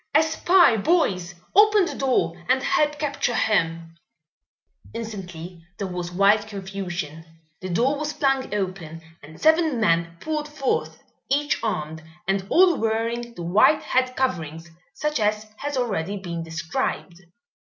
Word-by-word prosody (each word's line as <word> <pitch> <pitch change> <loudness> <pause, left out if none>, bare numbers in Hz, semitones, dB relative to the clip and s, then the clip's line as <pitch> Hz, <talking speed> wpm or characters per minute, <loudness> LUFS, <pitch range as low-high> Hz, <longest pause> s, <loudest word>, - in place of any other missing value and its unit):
"A 310 - +7
spy, 320 -4 +4
boys! 195 - +1 0.2
Open 420 -1 +6
the - - -4
door 250 -11 +1 0.2
and 260 +1 +3
help 295 -1 +1
capture 280 -5 -1
him!" 165 -7 0 1.0
Instantly 180 -6 -7
there 200 - -3
was 180 -1 -5
wild 200 +3 +3
confusion. 190 -6 -5 0.4
The 185 - -6
door 255 +11 +1
was 300 0 -2
flung 270 -3 0
open 185 -5 -4 0.2
and 155 +2 -13
seven 315 -4 +3
men 170 -5 +1
poured 305 - -3
forth, 295 -3 -2 0.3
each 290 +2 +1
armed, 160 -7 -3 0.3
and 195 0 0
all 360 -1 +5
wearing 230 +2 -2
the 175 - -6
white 210 - +4
head 255 0 0
coverings, 165 - -2 0.2
such 300 -3 -1
as 210 0 0
has 290 -1 -4
already 205 -6 -1
been 170 -3 -5
described. 170 +2 -4
210 Hz, 135 wpm, -24 LUFS, 175-275 Hz, 1.0 s, A